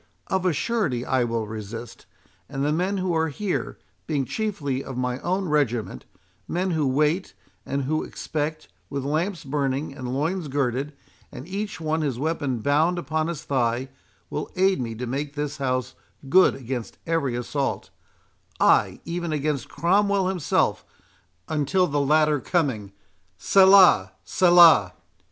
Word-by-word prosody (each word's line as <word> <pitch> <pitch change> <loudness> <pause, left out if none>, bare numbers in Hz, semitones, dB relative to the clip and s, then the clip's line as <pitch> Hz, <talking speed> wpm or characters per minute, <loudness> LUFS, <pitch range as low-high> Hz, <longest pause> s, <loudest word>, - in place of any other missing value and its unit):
Of 190 -1 0
a - - +3
surety 155 - -1
I 130 -2 +1
will 115 -1 -2
resist; 110 +1 -8 0.4
and 135 0 -2
the 150 - +1
men 185 +5 0
who 185 -2 -1
are 160 0 +2
here, 190 +5 -3 0.3
being 145 -4 0
chiefly 145 - -2
of 130 - -7
my 125 0 -2
own 185 +4 -1
regiment—men 120 - -3
who 155 -4 +1
wait, 150 +7 0 0.3
and 140 0 -1
who 155 +4 0
expect, 155 0 -4 0.2
with 140 -1 -4
lamps 160 +4 -1
burning 140 0 -2
and 125 -3 -6
loins 160 +6 -1
girded, 135 +1 -1 0.4
and 130 - -9
each 205 +1 -4
one 160 0 -1
his 140 -6 -1
weapon 140 -4 -2
bound 155 +7 +2
upon 155 0 -1
his 165 -3 -5
thigh, 125 -1 0 0.4
will 150 - -4
aid 190 -3 +2
me 115 -2 -4
to 125 +3 -5
make 140 +4 -4
this 150 0 -3
house 130 -2 -2 0.3
good 185 +7 +5
against 125 -2 -6
every 160 -7 0
assault—ay, 135 +3 -1
even 170 0 -3
against 150 -3 -2
Cromwell 195 +2 +2
himself, 180 -6 0 0.6
until 155 +5 +1
the 145 -3 0
latter 150 +1 +3
coming—Selah! 140 - +3
Selah!" 170 - +6
150 Hz, 135 wpm, -24 LUFS, 130-170 Hz, 0.6 s, Selah